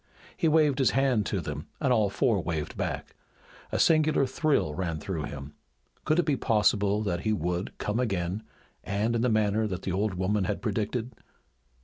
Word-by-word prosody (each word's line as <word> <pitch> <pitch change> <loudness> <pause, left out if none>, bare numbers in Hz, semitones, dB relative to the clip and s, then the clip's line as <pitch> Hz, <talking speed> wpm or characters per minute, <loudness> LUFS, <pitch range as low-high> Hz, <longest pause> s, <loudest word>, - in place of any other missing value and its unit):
He 165 - +1
waved 150 -3 +3
his 135 - +4
hand 130 -6 +2
to 100 - -1
them 75 0 -6
and 135 -4 +2
all 110 -4 +3
four 110 -2 +1
waved 80 -3 -3
back. - - -4 0.6
A - - 0
singular 155 -3 +4
thrill 130 - +1
ran 85 -1 -2
through 80 -1 -4
him. 70 0 -8 0.5
Could 155 - +2
it 175 - +3
be 150 - +2
possible 105 -3 +2
that 85 -4 -1
he 110 +4 -1
would 90 -1 -2
come 105 +3 -2
again, 95 -4 -1 0.4
and 105 +4 0
in 115 - +1
the 125 - +2
manner 110 0 +2
that 95 -2 -5
the 95 - -2
old 100 +1 0
woman 95 +2 0
had 100 +2 -2
predicted? 115 +3 -2
105 Hz, 180 wpm, -28 LUFS, 90-125 Hz, 0.6 s, his